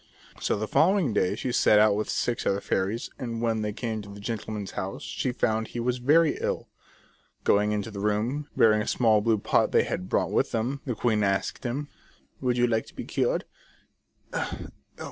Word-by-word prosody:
So - - 0
the 110 +1 -3
following 175 - +3
day 90 -3 +1
she 125 - -3
set 105 - +4
out 105 -1 +5
with 105 - -2
six 120 -1 -1
other 100 - +2
fairies, 100 +4 -2
and 115 -2 -4
when 115 -1 0
they 105 0 -1
came 110 0 -3
to 100 - -11
the 100 0 -10
gentleman's 105 -1 -4
house 95 +1 -5
she 130 - -2
found 110 -2 0
he 120 - -6
was 125 +1 0
very 155 +5 +4
ill. - - -2 0.8
Going 105 +1 +3
into 105 +1 -2
the 100 - -6
room, 110 +8 -1
bearing 110 -1 +5
a - - -4
small 110 -4 +3
blue 110 0 +2
pot 100 - +2
they - - +4
had 90 - -4
brought - - +1
with - - +1
them, 125 +5 -1
the 125 - -1
queen 110 -2 +1
asked 100 -1 -1
him: 135 +5 -2 0.3
" - - -36
Would 125 -2 +1
you 120 - +4
like 115 -2 0
to - - -15
be - - -6
cured - - 0
110 Hz, 200 wpm, -27 LUFS, 105-125 Hz, 0.8 s, out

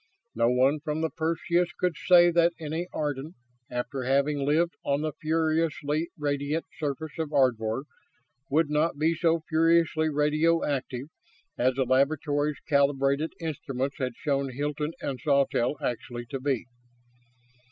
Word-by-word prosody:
No 115 0 +2
one 130 +4 +3
from 150 +1 -3
the 160 - -1
Perseus 170 +2 0
could 180 -3 0
say 175 +3 +5
that 170 0 +3
any 160 +2 -3
Ardan, 150 +2 -3 0.3
after 125 +2 -3
having 140 +3 +1
lived 155 +5 +2
on 140 +1 0
the 155 -1 -2
furiously 160 0 0
radiant 145 +1 -1
surface 155 +1 -4
of 160 -2 -2
Ardvor, 125 -4 +1 0.7
would 150 +1 +2
not 150 0 +1
be 155 +2 +2
as 165 -1 +3
furiously 160 0 +3
radioactive 150 -3 0 0.5
as 125 +1 +1
the 135 - +2
laboratory's 145 +3 +1
calibrated 140 +1 +2
instruments 140 -4 -3
had 125 -3 -2
shown 140 -2 -1
Hilton 150 +4 -3
and 135 -2 -3
Sawtelle 140 -2 +2
actually 120 0 -4
to 135 - -3
be. 130 -3 -1
150 Hz, 130 wpm, -27 LUFS, 135-160 Hz, 0.7 s, say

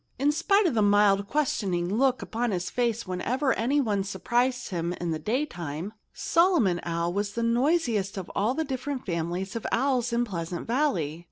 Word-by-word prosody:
In 285 +3 +3
spite 395 +7 +2
of 330 - +2
the 220 - +2
mild, 205 -1 +4
questioning 195 -11 0
look 255 +1 +2
upon 235 +2 -2
his 180 -3 -2
face 235 -2 0
whenever 250 +10 0
anyone 230 -5 +1
surprised 240 +6 -1
him 170 -2 -2
in 175 -1 -3
the 160 - -2
daytime, 175 - -3 0.2
Solomon 330 - +2
Owl 170 0 -2
was 200 +1 -2
the 235 - -2
noisiest 235 - +1
of 185 -2 -5
all 220 +6 +1
the 320 - 0
different 270 0 -4
families 175 +3 -3
of 230 - -3
owls 255 -1 +1
in 235 +1 +1
Pleasant 175 -4 -5
Valley. 200 - 0
220 Hz, 170 wpm, -27 LUFS, 180-255 Hz, 0.2 s, mild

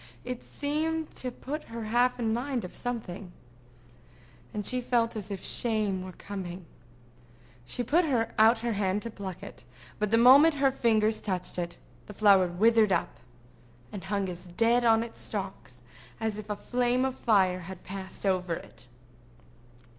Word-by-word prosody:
It 250 -1 -5
seemed 315 +2 -2
to 255 - -1
put 285 +5 -6
her 230 0 -6
half 240 +3 +2
in 225 -2 0
mind 245 -1 -2
of 180 - -9
something, 210 -7 -5 1.2
and 210 -1 -4
she 250 +3 0
felt 235 -1 +1
as 210 -2 -6
if 195 -2 -6
shame 215 -5 0
were 185 0 -8
coming. 185 -3 -7 1.0
She 245 - -3
put 325 +9 +3 0.3
out 225 +2 +6
her 235 -1 -1
hand 200 0 0
to 230 - -5
pluck 195 -4 -7
it; - - -10 0.4
but 210 -1 0
the 225 - +4
moment 275 +7 +7
her 275 -1 +3
fingers 220 -4 +2
touched 185 -3 -3
it, 170 -1 -4 0.3
the 210 - -10
flower 195 -3 +5
withered 215 +4 +3
up, - - 0 0.7
and 195 -2 -7
hung 200 0 -1
as 180 0 -7
dead 230 +7 +2
on 225 -1 +4
its 230 - -9
stalks 190 - -6 0.4
as 220 -2 -2
if 215 0 -9
a 210 - -1
flame 245 +3 0
of 265 - -1
fire 195 -7 +2
had 185 0 -9
passed 190 +1 -6
over 180 -3 +1
it. 120 -4 -11
215 Hz, 160 wpm, -29 LUFS, 190-245 Hz, 1.2 s, moment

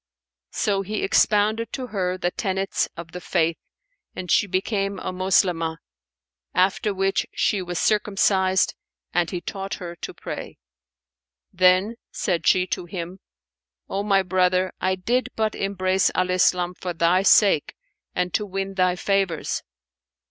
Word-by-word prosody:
So 200 -2 0
he 210 +2 -3
expounded 215 +3 +2
to 260 - -3
her 185 -5 -2
the 175 -1 -1
tenets 195 -1 -1
of 165 -1 -8
the 180 +1 -7
Faith, 165 -3 0 0.6
and 180 -2 -4
she 205 - +4
became 195 +1 -1
a - - -4
Moslemah, 180 -3 +1 0.8
after 190 +3 +2
which 195 0 0
she 200 - +1
was 175 -1 -4
circumcised[FN#486] 190 -2 +2 0.4
and 175 -1 +1
he 180 - -4
taught 195 +1 -5
her 175 -2 -7
to - - -6
pray. - - -7 1.0
Then 185 +5 +3
said 175 -5 -1
she 180 -1 +4
to 180 - -3
him, 175 +1 -6 0.7
"O 195 - -1
my 195 -2 +2
brother, 185 0 +1
I 185 0 +1
did 235 +8 0
but 220 -1 0
embrace 190 -1 +1
Al 185 0 +1
Islam 180 -1 +2
for 180 0 -5
thy 170 +2 +3
sake 195 -5 +4 0.4
and 180 -1 -1
to 210 - +1
win 195 -1 -4
thy 185 -1 +2
favours." 195 -3 0
185 Hz, 140 wpm, -23 LUFS, 180-195 Hz, 1.0 s, she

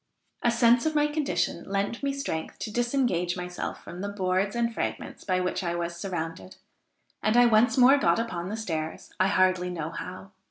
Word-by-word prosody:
A 240 - +3
sense 235 +3 +4
of 310 - -1
my 295 0 +4
condition 280 - -1
lent 200 +4 -1
me 280 0 0
strength 275 - -4
to 215 - -5
disengage 240 -8 0
myself 180 0 -5
from 175 +2 -8
the 200 - -3
boards 195 +1 0
and 235 -1 0
fragments - - -4
by 185 -1 +1
which 185 +1 -1
I 170 -1 -1
was 170 0 -3
surrounded, 165 - -5 0.7
and 215 +3 +2
I 245 - +7
once 235 +3 +4
more 265 +3 +7
got - - +3
upon 180 -6 -3
the 215 - -3
stairs, 160 -7 -4
I 185 - +4
hardly 185 -2 +2
know 165 -3 -4
how. 185 +3 -7
195 Hz, 190 wpm, -27 LUFS, 175-235 Hz, 0.7 s, I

